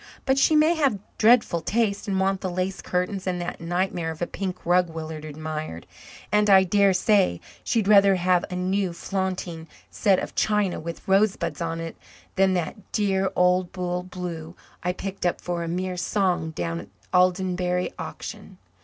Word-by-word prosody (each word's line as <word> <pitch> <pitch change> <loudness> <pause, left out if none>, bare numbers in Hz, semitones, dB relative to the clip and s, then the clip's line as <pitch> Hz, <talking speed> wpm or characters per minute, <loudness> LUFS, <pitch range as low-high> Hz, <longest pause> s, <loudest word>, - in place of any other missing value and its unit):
But 270 0 +3
she 310 - +4
may 310 +2 +5
have 280 -10 +1 0.2
dreadful 220 -7 +4
taste 210 +3 0
and 195 -1 0
want 190 0 +1
the 185 - -2
lace 185 +2 -2
curtains 185 +2 -2
and 180 -1 -1
that 175 -1 -5
nightmare 175 0 -1
of 160 -1 -6
a 175 - 0
pink 185 0 -5
rug 175 0 +3
Willard 160 -1 -6
admired, 155 - -6 0.5
and 210 0 +3
I 190 -1 +8
dare 200 +1 +4
say 185 - +2 0.2
she'd 220 -4 0
rather 200 -2 +6
have 180 0 +2
a 180 - -4
new 185 0 0
flaunting 180 -3 -3 0.2
set 195 -2 +3
of - - -4
china 210 -3 +1
with 170 +1 -7
rosebuds 195 -1 +1
on 165 0 -2
it 165 0 -6 0.4
than 190 -1 +3
that 180 +4 -4
dear 195 -2 +1
old 180 0 +3
dull 180 -1 -2
blue 180 -2 -7 0.3
I 180 - 0
picked 195 +1 -6
up 175 - +1
for 175 -1 -3
a - - -4
mere 180 +2 -2
song 180 -3 0
down 85 - -3
at - - -9
the - - -4
Aldenbury 180 0 +1
auction. - - -8
185 Hz, 175 wpm, -25 LUFS, 175-195 Hz, 0.5 s, I